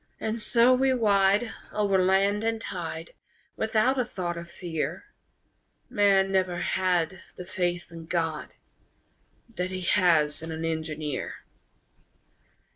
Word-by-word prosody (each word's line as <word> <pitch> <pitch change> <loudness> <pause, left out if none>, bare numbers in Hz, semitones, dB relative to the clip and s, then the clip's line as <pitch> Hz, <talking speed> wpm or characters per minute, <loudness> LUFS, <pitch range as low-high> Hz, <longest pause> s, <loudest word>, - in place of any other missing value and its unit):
And 220 +1 -2
so 235 +3 +5
we 265 +1 +3
ride 205 -2 +3 0.2
Over 200 -2 +2
land 195 +3 +2
and 225 0 0
tide, - - -5 0.4
Without 220 +4 +1
a - - +3
thought 180 -7 -4
of 170 0 -8
fear 160 -2 -4 0.9
_Man 195 -2 +4
never 185 -2 +1
had 185 0 0
The 180 - -8
faith 175 -2 -2
in 165 -1 -10
God 165 -3 -2 1.1
That 180 +1 -1
he 185 0 -4
has 165 -6 +3
in 160 0 -6
an 160 0 -4
engineer! 155 -3 -3
185 Hz, 120 wpm, -27 LUFS, 170-210 Hz, 1.1 s, so